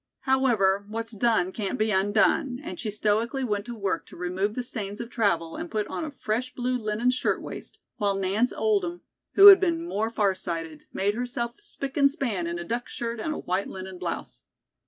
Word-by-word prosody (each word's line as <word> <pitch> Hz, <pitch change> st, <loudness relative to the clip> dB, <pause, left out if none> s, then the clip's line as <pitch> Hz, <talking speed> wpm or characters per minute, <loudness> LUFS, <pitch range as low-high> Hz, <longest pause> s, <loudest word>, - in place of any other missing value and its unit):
However, 230 Hz, -8 st, +3 dB
what's 230 Hz, +2 st, -4 dB
done 215 Hz, -4 st, +2 dB
can't 200 Hz, -1 st, -3 dB
be 215 Hz, 0 st, +1 dB
undone," 215 Hz, +7 st, +2 dB
and -, -, -6 dB
she 225 Hz, -, -2 dB
stoically 220 Hz, +5 st, 0 dB
went 205 Hz, -4 st, -1 dB
to 240 Hz, -1 st, -6 dB
work 195 Hz, -5 st, -2 dB
to -, -, -13 dB
remove 185 Hz, +4 st, -1 dB
the 250 Hz, -, -2 dB
stains 205 Hz, -4 st, -5 dB
of 235 Hz, 0 st, -6 dB
travel 170 Hz, -9 st, +1 dB
and 175 Hz, -, -5 dB
put 215 Hz, -1 st, -1 dB
on -, -, -3 dB
a 315 Hz, -, -3 dB
fresh 255 Hz, -2 st, -3 dB
blue 250 Hz, 0 st, 0 dB
linen 225 Hz, +1 st, +1 dB
shirtwaist; 255 Hz, -, -3 dB, 0.2 s
while 200 Hz, -1 st, +1 dB
Nance 195 Hz, +5 st, +1 dB
Oldham, 385 Hz, -5 st, 0 dB, 0.3 s
who 395 Hz, -, +8 dB
had 395 Hz, -, +10 dB
been 335 Hz, -3 st, 0 dB
more 220 Hz, -, -1 dB
far 205 Hz, -4 st, +2 dB
sighted, 165 Hz, -4 st, -5 dB
made 200 Hz, +2 st, 0 dB
herself 240 Hz, 0 st, -3 dB
spic 280 Hz, -9 st, -6 dB
and 280 Hz, -1 st, +6 dB
span 235 Hz, -, -2 dB
in 170 Hz, 0 st, -3 dB
a 170 Hz, -, -4 dB
duck 235 Hz, +7 st, -3 dB
skirt 235 Hz, -1 st, -4 dB
and 310 Hz, -, -2 dB
a 305 Hz, -, -3 dB
white 185 Hz, +2 st, -1 dB
linen 190 Hz, -1 st, -8 dB
blouse. -, -, -5 dB
220 Hz, 200 wpm, -26 LUFS, 195-250 Hz, 0.3 s, had